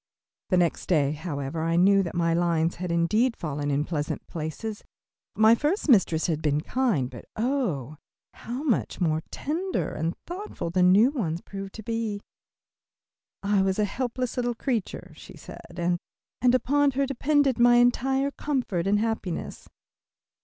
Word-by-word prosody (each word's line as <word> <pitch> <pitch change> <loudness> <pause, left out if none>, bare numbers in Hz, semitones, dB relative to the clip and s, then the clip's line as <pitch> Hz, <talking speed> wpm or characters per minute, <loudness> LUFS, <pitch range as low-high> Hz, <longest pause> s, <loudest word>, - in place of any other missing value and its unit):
The 185 - +3
next 175 -2 +1
day, 145 -6 +2
however, 150 -1 -4
I 165 +1 0
knew 195 +3 +5
that 175 -2 -4
my 170 -1 +2
lines 170 -1 +1
had 180 0 -3
indeed 215 +9 +2
fallen 145 -2 -3
in 145 +1 0
pleasant 150 -3 -3
places. 170 +7 -5 0.5
My 220 +1 +6
first 300 - 0
mistress 185 - +4
had 160 -3 -1
been 150 -1 +1
kind, 215 - 0
but 125 -2 -11
oh, 210 - -1 0.4
how 245 +5 -6
much 265 -8 0
more 160 -3 +1
tender 350 +6 -2
and 165 +2 -2
thoughtful 360 - -5
the 180 +1 +1
new 195 +8 +6
one 180 - -2
proved 195 +2 -8
to 220 - -8
be! 225 -2 -2 1.2
"I 200 0 +2
was 190 0 +1
a 210 - +2
helpless 250 +3 -3
little 245 -1 0
creature," 230 -4 -3
she - - -13
said, 175 - -12
"and 175 0 0 0.6
upon 285 +3 +3
her 275 - +3
depended 275 0 +1
my 240 0 +6
entire 265 +3 +2
comfort 250 - -2
and 205 +1 +3
happiness." 210 -5 -3
195 Hz, 155 wpm, -26 LUFS, 165-245 Hz, 1.2 s, My